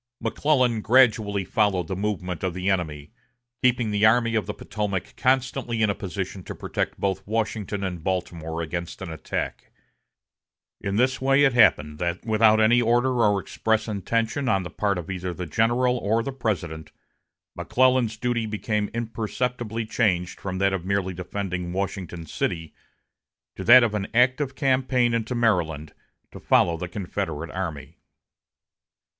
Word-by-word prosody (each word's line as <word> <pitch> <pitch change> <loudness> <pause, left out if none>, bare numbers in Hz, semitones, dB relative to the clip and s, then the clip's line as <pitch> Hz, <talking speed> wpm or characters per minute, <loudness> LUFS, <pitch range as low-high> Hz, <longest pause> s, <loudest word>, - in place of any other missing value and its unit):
McClellan 130 -7 +1
gradually 110 -5 +3
followed 100 -3 +1
the 95 - -3
movement 95 -3 -3
of 90 -2 -1
the 90 +2 0
enemy, 75 -6 -3 0.5
keeping 120 -3 +2
the 105 0 0
Army 115 +1 +4
of 110 -3 0
the 105 - -3
Potomac 100 -2 -4
constantly 130 -3 0
in 105 - +3
a - - -1
position 95 0 -5
to - - -7
protect - - -3
both 95 -1 -1
Washington 105 -2 -2
and 90 -4 -4
Baltimore 85 -3 -3
against 85 +3 -5
an 85 - -6
attack. 80 - -5 1.1
In 100 0 -2
this 130 +4 +1
way 135 +1 +4
it 135 -3 +4
happened 75 -11 +4
that 85 +3 -2
without 110 -1 +4
any 120 +3 +5
order 120 +2 +2
or 105 -2 +3
express 110 +2 -1
intention 115 - -1
on 95 -5 +2
the 85 - -7
part 100 0 0
of 90 +2 -5
either 90 -1 -4
the 90 - -5
general 120 - +1
or 110 +2 +1
the 135 - -3
President, 95 - -3 0.6
McClellan's 125 -3 +2
duty 120 -1 -1
became 105 0 -2
imperceptibly 115 0 -3
changed 95 -5 0
from 95 -1 -4
that 95 +1 +2
of 95 -3 -2
merely 95 -1 -1
defending 90 -1 -4
Washington 95 -3 -4
city 80 +1 -3 0.8
to - - -6
that 125 +1 +9
of 115 -3 +1
an 100 -2 -2
active 130 +3 +2
campaign 130 -3 +2
into 115 +2 -1
Maryland 85 -10 0 0.4
to - - -10
follow 85 - +3
the 90 +1 -5
Confederate 85 -4 -4
army. 85 -6 -5
105 Hz, 150 wpm, -25 LUFS, 90-120 Hz, 1.1 s, that